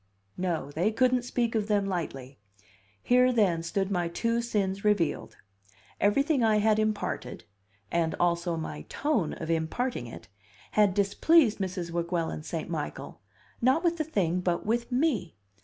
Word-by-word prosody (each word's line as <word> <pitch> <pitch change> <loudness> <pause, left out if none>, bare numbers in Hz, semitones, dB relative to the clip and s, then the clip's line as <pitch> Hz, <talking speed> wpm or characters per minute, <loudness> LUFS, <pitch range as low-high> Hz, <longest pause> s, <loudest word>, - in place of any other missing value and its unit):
No, 170 -6 -2
they 175 +9 +1
couldn't 255 +2 +2
speak 240 -2 -1
of 215 -2 0
them 205 -2 +2
lightly! 140 - -4 0.6
Here, 250 +1 +4
then, 195 -9 +2
stood 195 +3 -2
my 175 -3 0
two 230 +7 0
sins 200 -4 -1
revealed; 205 -8 0 0.6
everything 275 +6 +2
I 220 -1 +4
had 215 0 +3
imparted, 215 -1 -2 0.5
and 165 -1 0
also 170 -1 +1
my 75 - -5
tone 275 - 0
of 165 0 -4
imparting 165 - -1
it, 115 - -10 0.4
had 205 -3 +3
displeased 220 +5 +3
Mrs. 180 -3 -3
Weguelin 170 - -2
St. - - -5
Michael, - - -5 0.4
not 260 +8 +3
with 340 -1 +1
the 315 - 0
thing, 185 - 0
but 175 -1 -1
with 235 +3 -1
me. 250 - 0
200 Hz, 145 wpm, -28 LUFS, 170-235 Hz, 0.6 s, Here